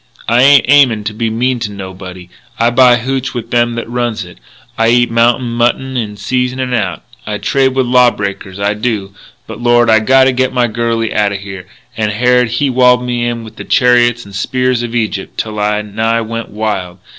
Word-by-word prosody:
I 120 +2 +3
ain't 140 -1 +6
aimin' 130 -6 +4
to 105 0 -4
be 115 +1 -2
mean 125 +3 -1
to 110 -3 -4
nobody. 95 -2 -9 0.3
I 115 +1 +2
buy 125 0 +5
hootch 130 +2 -3
of 115 -1 -6
them 120 -1 +1
that 115 - -5
runs 120 -4 -3
it. 90 - -15 0.4
I 115 0 +2
eat 120 0 +2
mountain 120 +1 +1
mutton 120 +3 -1
in 105 -4 -3
season 125 +4 -2
and 130 -1 -2
out. 95 -8 -2 0.2
I 105 -1 -3
trade 130 +3 0
with 130 -1 +1
law 125 0 +4
breakers, 100 -2 -6
I 100 +1 0
do. 105 -3 -3 0.3
But, 110 +1 -9
Lord, 120 -1 +3
I 110 - +5
gotta 130 +4 +4
get 130 0 -1
my 125 -1 +2
girlie 115 0 -2
outa 105 -1 +1
here; 100 -2 -8 0.3
and 110 -1 -1
Harrod 125 +3 +2
he 120 +5 -1
walled 125 -1 +3
me 120 -1 -1
in 120 -1 -4
with 110 0 -13
the - - -7
chariots 120 -2 +2
and 100 - -13
spears 125 +4 -1
of 120 0 -5
Egypt, 110 -4 -3
till 110 -1 -4
I 105 0 0
nigh 110 +2 -1
went 115 0 -5
wild.... 100 -4 -4
115 Hz, 205 wpm, -13 LUFS, 105-125 Hz, 0.4 s, ain't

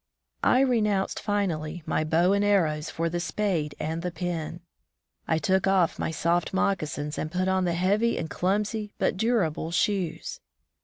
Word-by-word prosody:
I 255 - +5
renounced 210 -7 +1
finally 175 -6 -2
my - - 0
bow 170 +4 +3
and 200 0 +2
arrows 165 -7 +2
for 165 +1 -1
the 175 +1 -2
spade 170 -6 -1
and 160 +2 -2
the 180 - -2
pen; 170 -1 -4 0.7
I 160 - +2
took 190 +2 +1
off 190 -3 +2
my - - -1
soft 170 +3 0
moccasins 155 -6 -1
and 155 - -3
put 185 +1 0
on 190 -1 +2
the 170 -1 0
heavy 205 +6 +2
and 160 - -2
clumsy 210 +4 -1
but - - +1
durable 190 -7 0
shoes. 180 0 -1
180 Hz, 160 wpm, -27 LUFS, 160-200 Hz, 0.7 s, I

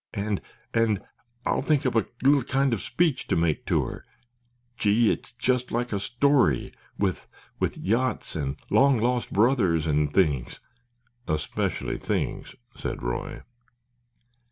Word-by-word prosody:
"And—and—I'll 110 +3 -2
think 150 +1 +1
up 130 - +1
a 115 -3 +2 0.2
little 140 +1 +5
kind 135 +1 +1
of 110 - 0
a - - -8
speech 155 +4 0
to - - +1
make 80 -2 0
to - - +2
her—gee, 120 -2 -2
it's - - -4
just 125 +1 0
like 120 0 -1
a 100 - 0
story, 120 - +2 0.2
with—with—yachts 125 +5 -2
and 70 -3 -2 0.2
long 140 -1 +5
lost 120 +1 0
brothers 100 - +3
and 75 -1 +1
things——" 75 -9 +1 0.7
"Especially 75 0 -2
things," - - -3 0.2
said - - -5
Roy. - - -4
120 Hz, 120 wpm, -26 LUFS, 95-125 Hz, 0.7 s, little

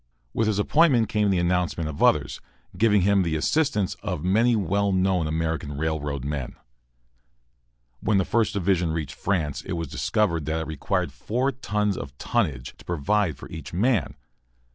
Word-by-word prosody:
With 110 - +1
his 105 -2 +1
appointment 125 0 +3
came 105 -1 +1
the 95 - +2
announcement 85 -2 0
of 75 -2 -6
others, - - +2 0.3
giving 105 +1 +4
him 100 0 +4
the 85 -3 0
assistance 105 - +1
of 90 -7 -3
many 115 +6 +3
well 100 0 +1
known 95 -3 +1
American 80 -2 -2
railroad 75 -3 -2
men. 70 -3 -4 1.4
When 105 - +1
the 95 - +2
First 115 -2 +1
Division 90 -4 +1
reached 75 -4 -3
France 75 -6 -1
it 95 - -5
was 85 -4 -3
discovered 85 - 0
that 80 +1 -1
it - - -4
required 80 -2 -2
four 125 +5 -1
tons 105 -5 -1
of 70 0 -7
tonnage 65 -2 -1
to - - -14
provide 90 0 0
for - - -10
each 80 +1 -8
man. 105 - +1
90 Hz, 165 wpm, -25 LUFS, 80-105 Hz, 1.4 s, giving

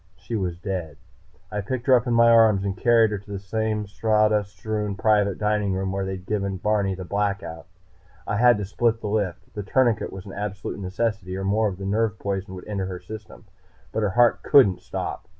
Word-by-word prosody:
She 100 +4 -6
was 90 -5 -2
dead. 90 -6 -4 0.5
I 105 -1 -2
picked 120 +4 -4
her 130 - +5
up 125 0 +4
in 120 - +1
my 115 0 +6
arms 110 -4 +5
and 95 -1 -2
carried 115 -2 +4
her 105 - -2
to 100 +1 -14
the - - -3
same 105 +2 -2
sawdust 105 0 +1
strewn 105 +1 -2
private 105 -2 +2
dining 105 -2 0
room 95 0 -2
where 95 0 -2
I'd 95 -1 -6
given 100 -2 -2
Barney 100 -1 0
the 95 0 -7
Blackout. 100 -4 -3 0.6
I 105 - -1
had 120 0 +5
to 105 - -3
split 115 +3 0
the 110 - -5
lift. 95 -3 -2
The 105 - -4
tourniquet 115 +1 +1
was 95 -1 -9
an 95 - -9
absolute 100 0 -5
necessity, 95 -1 -2
or 95 - -4
more 105 +3 +2
of 95 -3 -4
the 95 - -6
nerve 105 +1 0
poison 95 -1 -4
would 90 - -10
enter 100 -3 -2
her 90 -1 -5
system. 110 +2 -10 0.5
But 110 - -1
her 105 - +1
heart 120 -1 +5
couldn't 105 -10 +5
stop. - - -5
105 Hz, 210 wpm, -24 LUFS, 95-110 Hz, 0.6 s, my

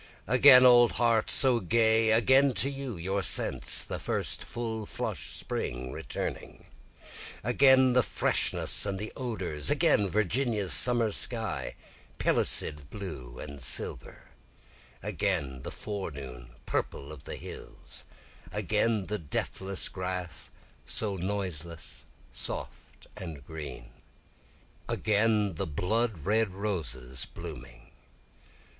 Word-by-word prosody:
Again 125 0 +8
old 120 -1 +7
heart 115 -2 +2
so 130 -3 +6
gay, 110 +3 +3
again 130 +4 +4
to 140 - 0
you, 135 -6 -6
your 95 +4 -2
sense, - - +3
the - - -5
full 110 -2 -4
flush - - -4
spring 65 +1 -4
returning, - - -6 0.8
Again 130 +2 +5
the 125 - +5
freshness - - +1
and 100 -1 -2
the 105 +3 -6
odors, 95 - -3
again 100 - +3
Virginia's 105 +1 +2
summer 120 -3 +6
sky, 105 - -3 0.4
pellucid 75 -2 0
blue 70 -12 -8
and 70 -2 -8
silver, 60 - -2 0.7
Again 65 -2 -1
the - - -6
forenoon 70 - -7
purple 70 +2 -3
of 75 -2 -12
the - - -6
hills, - - -10 0.5
Again 105 -1 0
the 105 +2 -2
deathless 95 +5 -2
grass, 90 -3 -5 0.3
so 105 -3 -4
noiseless 90 -4 -5 0.3
soft - - -8
and 80 -7 -8
green, 75 -6 -8 1.0
Again 105 -1 +1
the 80 - -3
blood 100 +3 -1
red 105 -1 +1
roses 65 - -4
blooming. - - -10
100 Hz, 105 wpm, -29 LUFS, 75-115 Hz, 1.0 s, Again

